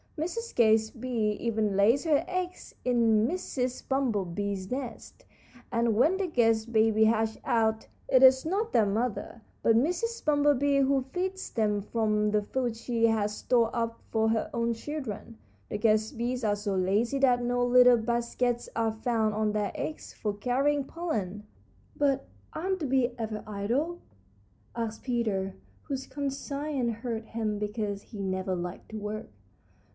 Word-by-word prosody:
Mrs. 460 +10 -3
Guest 220 0 +3
Bee 230 -4 0
even 220 -3 0
lays 220 +8 +4
her 305 -1 +3
eggs 365 0 -4
in 230 -3 +3
Mrs. 255 -7 -3
Bumblebee's 200 -7 -1
nest, 255 -2 -6 0.5
and 230 -2 +2
when 310 - +4
the 385 -1 -1
guest 230 -6 +2
babies 220 -1 +4
hatch 220 0 +1
out, 220 -3 +1 0.2
it 255 - +4
is 260 0 +7
not 410 +7 -1
their 220 - +4
mother, 225 +2 -2 0.2
but 225 - +5
Mrs. 360 - 0
Bumblebee, 285 -1 +3
who 270 -1 +2
feeds 375 +1 -3
them 210 -3 +1
from 210 0 0
the 210 0 +2
food 240 +2 -2
she 230 0 +1
has 210 -2 0
stored 235 -1 +2
up 230 -1 -2
for 220 0 +2
her 225 -1 0
own 235 0 0
children. 230 - -6 0.3
The - - -2
guest 215 +2 +2
bees 245 +1 -2
are 210 -1 +2
so 205 -1 -2
lazy 205 +8 +1
that 250 -2 +3
no 245 0 +1
little 250 0 +7
baskets 235 +1 -1
are 225 -1 +1
found 220 -1 0
on 215 0 +1
their 210 -1 -1
legs 310 - -5
for 210 -2 -3
carrying 270 +7 +1
pollen." 210 - -4 0.5
"But 275 -2 +1 0.3
aren't 375 +3 -2
the 310 - -2
bees 260 -1 +2
ever 220 -2 -4
idle?" 240 +12 -1 0.8
asked 230 -2 -4
Peter, 210 -6 -1 0.3
whose 270 -2 -4
conscience 280 -3 -2
hurt 230 -1 -4
him 220 -2 -2
because 210 -1 -3
he 210 0 -11
never 190 -1 -1
liked 175 +1 -6
to 220 - -6
work. 210 +1 -5
230 Hz, 150 wpm, -29 LUFS, 215-270 Hz, 0.8 s, is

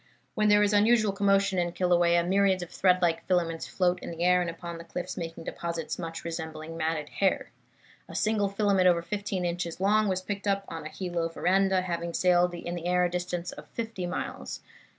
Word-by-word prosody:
When 215 0 +2
there 205 0 +6
is 205 0 +2
unusual 215 0 +4
commotion 195 -1 +2
in 175 -1 -1
Kilauea 175 -1 +3
myriads 190 -1 +3
of 175 - -10
thread 185 -1 +3
like 165 -1 +1
filaments 170 -3 0
float 180 -1 +1
in - - -7
the 170 0 -4
air 180 0 +4
and 175 - -1
fall 165 - -6
upon 170 -1 -6
the - - -8
cliffs, 175 +1 -5
making 165 0 -6
deposits 170 0 -4
much 165 -1 -6
resembling 160 -1 -5
matted 160 -2 -1
hair. 195 -2 0 0.6
A - - -9
single 215 -2 +1
filament 200 -2 +2
over 170 -2 +3
fifteen 200 -1 -3
inches 170 -1 -3
long 210 +2 +3
was 185 -1 -1
picked 200 +1 -4
up 200 0 +1
on 160 -1 -6
a - - -8
Hilo 175 -2 -3
veranda, 190 +2 +2
having 170 -1 -3
sailed 180 -1 +3
in 175 0 -5
the 175 0 -4
air 180 0 +3
a 175 - -1
distance 180 0 -3
of - - -11
fifty 225 -6 -4
miles. 180 - -5
180 Hz, 205 wpm, -28 LUFS, 170-195 Hz, 0.6 s, there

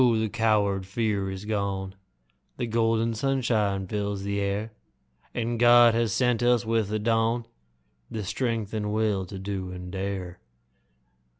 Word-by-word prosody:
the 110 0 0
coward 105 -4 +1
fear 100 -1 -1
is 95 +1 -6
gone 100 -3 -2 0.6
The 120 - -1
golden 115 0 +1
sunshine 110 -6 0
fills 100 0 -3
the 100 0 -1
air, 100 +2 -2 0.6
And 120 0 -1
God 120 -1 +7
has 115 -2 +1
sent 125 0 +2
us 120 -2 +3
with 110 -2 +1
the 105 +1 -1
dawn 115 +2 +1 0.6
The 110 - -4
strength 115 0 -2
and 105 -1 -2
will 105 -3 0
to 95 - -7
do 95 -1 -4
and 90 0 -7
dare. 95 -2 -4
105 Hz, 140 wpm, -26 LUFS, 100-115 Hz, 0.6 s, God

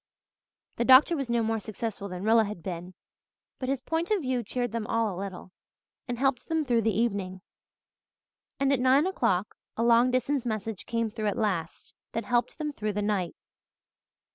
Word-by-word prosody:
The - - +1
doctor 260 +7 +7
was 275 -5 -3
no 235 -1 +2
more 225 0 0
successful 215 -1 -5
than 180 +1 -6
Rilla 225 +1 +5
had 200 -5 -7
been, 180 0 -6 0.6
but 255 - -3
his 270 -2 -1
point 325 +2 -1
of 415 -6 +1
view 255 -2 0
cheered 245 +1 -3
them 225 -1 -3
all 225 -3 0
a 180 - -5
little, 190 -2 -7 0.6
and 245 -1 -3
helped 265 -1 0
them 320 -2 0
through 240 -3 +2
the 220 -1 +1
evening. 195 -5 -1 1.2
And 275 0 +3
at 270 - +1
nine 260 +4 +4
o'clock 230 - 0 0.2
a 230 - +1
long 235 +1 +5
distance 255 +1 0
message 220 -3 -4
came 230 -2 -1
through 215 -1 -3
at 205 - -1
last, 185 -7 -2 0.2
that 230 -1 -2
helped 240 +1 0
them 300 -2 -3
through 215 -4 -3
the 210 +1 -1
night. 200 -5 -1
230 Hz, 185 wpm, -28 LUFS, 205-255 Hz, 1.2 s, doctor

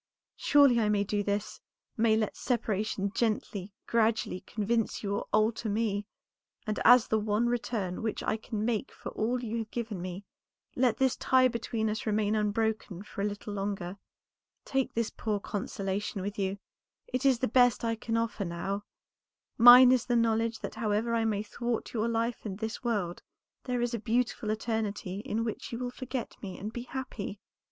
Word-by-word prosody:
Surely 280 -5 +5
I 215 -2 +2
may 205 -1 +2
do 205 +1 -1
this; 205 0 -2 0.3
may 220 -1 +3
let 215 -1 -1
separation 210 -4 -1
gently, 210 -4 -1
gradually 225 -4 +1
convince 225 +2 -1
you 200 0 -1
or - - -4
alter 215 +1 +2
me; 205 -1 -1 0.6
and 215 -1 -2
as 245 0 +7
the 220 - +2
one 210 +2 +1
return 230 -6 -1
which 220 -1 -2
I - - +1
can 220 -1 -4
make 235 +1 -1
for - - -8
all 240 +3 -1
you 230 0 -2
have 220 -1 -5
given 220 -6 -4
me, 185 +2 -6 0.5
let 245 -3 +2
this 265 -2 +2
tie 260 0 +4
between 230 -2 -2
us 215 +1 -3
remain 210 0 +1
unbroken 215 -2 -1
for 205 - -7
a - - +1
little 205 0 -4
longer. 195 -2 -3 0.7
Take 270 -1 -1
this 230 -1 0
poor 210 -2 -2
consolation 195 -1 -3
with 205 +1 -4
you; 195 0 -1 0.5
it 255 +1 -2
is 270 -3 +5
the 255 - 0
best 245 0 +4
that 230 - -1
I 230 - 0
can 225 0 -2
offer 230 -2 -1
now. 195 +3 -3 0.7
Mine 245 +2 +10
is 255 -2 +2
the 245 - +2
knowledge 230 -1 +1
that - - -5
however 220 +1 0
I 225 -1 +2
may 210 -2 0
thwart 235 +2 -3
your 225 -1 0
life 230 0 -1
in 205 -4 -4
this 220 +4 -5
world, 205 -8 -1 0.4
there 250 -1 -1
is 240 0 -1
a 235 - -1
beautiful 230 0 0
eternity 215 -3 -2
in 225 0 -2
which 225 -2 -4
you 230 - -3
will 245 0 -3
forget 255 -1 -5
me 190 -3 -6
and 210 +3 -6
be 240 0 -5
happy." 235 -6 -5
220 Hz, 180 wpm, -30 LUFS, 205-235 Hz, 0.7 s, Mine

